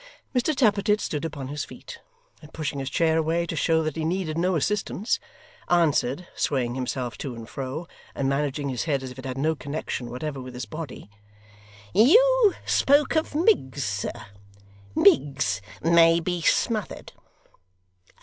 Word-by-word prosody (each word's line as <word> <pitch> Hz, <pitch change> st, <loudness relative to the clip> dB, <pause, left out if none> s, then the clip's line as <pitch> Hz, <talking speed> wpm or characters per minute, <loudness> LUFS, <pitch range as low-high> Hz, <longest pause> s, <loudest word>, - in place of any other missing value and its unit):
Mr 260 Hz, +4 st, +1 dB
Tappertit 210 Hz, -4 st, +3 dB
stood 150 Hz, -6 st, -3 dB
upon 145 Hz, -5 st, -5 dB
his 145 Hz, 0 st, -3 dB
feet, -, -, -11 dB, 0.4 s
and 150 Hz, -1 st, -14 dB
pushing 150 Hz, -3 st, -4 dB
his 135 Hz, -, -3 dB
chair 160 Hz, -1 st, +2 dB
away 165 Hz, +2 st, 0 dB
to 165 Hz, -, -4 dB
show 160 Hz, 0 st, +2 dB
that 155 Hz, -2 st, -3 dB
he 160 Hz, -, -3 dB
needed 165 Hz, -1 st, -1 dB
no 180 Hz, +2 st, +1 dB
assistance, 210 Hz, -, -1 dB, 0.5 s
answered, 170 Hz, -2 st, +2 dB
swaying 125 Hz, -4 st, 0 dB
himself 125 Hz, -2 st, -3 dB
to 130 Hz, -4 st, -5 dB
and 115 Hz, -1 st, -9 dB
fro, 135 Hz, +7 st, -5 dB, 0.3 s
and 135 Hz, -, -1 dB
managing 140 Hz, 0 st, -1 dB
his 125 Hz, +1 st, -2 dB
head 140 Hz, -4 st, 0 dB
as 130 Hz, -, -6 dB
if 125 Hz, -, -11 dB
it 130 Hz, -, -9 dB
had 130 Hz, 0 st, -4 dB
no 155 Hz, +4 st, +1 dB
connection 140 Hz, -5 st, -5 dB
whatever 135 Hz, +3 st, -5 dB
with 125 Hz, -1 st, -9 dB
his 125 Hz, -, -5 dB
body: 155 Hz, -9 st, -8 dB, 0.9 s
'You 465 Hz, -, +5 dB
spoke 285 Hz, +3 st, +3 dB
of 315 Hz, -1 st, 0 dB
Miggs, 300 Hz, -, +2 dB
sir 100 Hz, -1 st, -2 dB, 0.9 s
Miggs 135 Hz, -, +3 dB, 0.2 s
may 165 Hz, 0 st, +5 dB
be 175 Hz, +1 st, -2 dB
smothered! 215 Hz, +6 st, 0 dB
155 Hz, 155 wpm, -25 LUFS, 135-180 Hz, 0.9 s, You